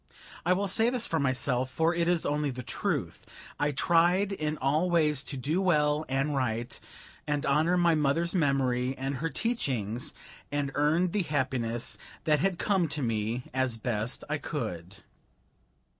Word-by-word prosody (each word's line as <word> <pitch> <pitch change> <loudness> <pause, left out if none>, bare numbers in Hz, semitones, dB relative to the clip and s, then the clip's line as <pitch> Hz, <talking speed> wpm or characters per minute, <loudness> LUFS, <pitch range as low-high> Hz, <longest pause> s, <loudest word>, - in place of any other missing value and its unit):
I 180 - +5
will 200 +2 0
say 225 +5 +4
this 245 -2 +1
for 165 - 0
myself, 130 -1 0
for 160 +6 +1
it 170 -1 0
is 175 -2 +2
only 150 0 0
the 125 -1 -6
truth: - - -2 0.4
I 145 0 +2
tried 175 +6 +3
in 155 -5 -2
all 150 +7 +1
ways 155 -5 +2
to 140 - -5
do 150 +8 0
well 150 -4 +2
and 135 +2 0
right, 120 -3 -2 0.5
and 145 -1 -1
honor 155 +6 +3
my 170 -1 +4
mother's 155 +3 +1
memory 135 -6 +1
and 135 +1 -3
her 165 +5 -2
teachings, 125 - -2 0.4
and 145 -1 -1
earn 160 +5 +2
the 210 - +1
happiness 130 -7 -1 0.2
that 150 -1 +3
had 185 +3 +1
come 190 -4 +1
to 150 -2 -3
me, 115 +1 -1
as 130 -3 0
best 110 0 -3
I - - -1
could. 90 +3 -5
145 Hz, 160 wpm, -29 LUFS, 130-170 Hz, 0.5 s, I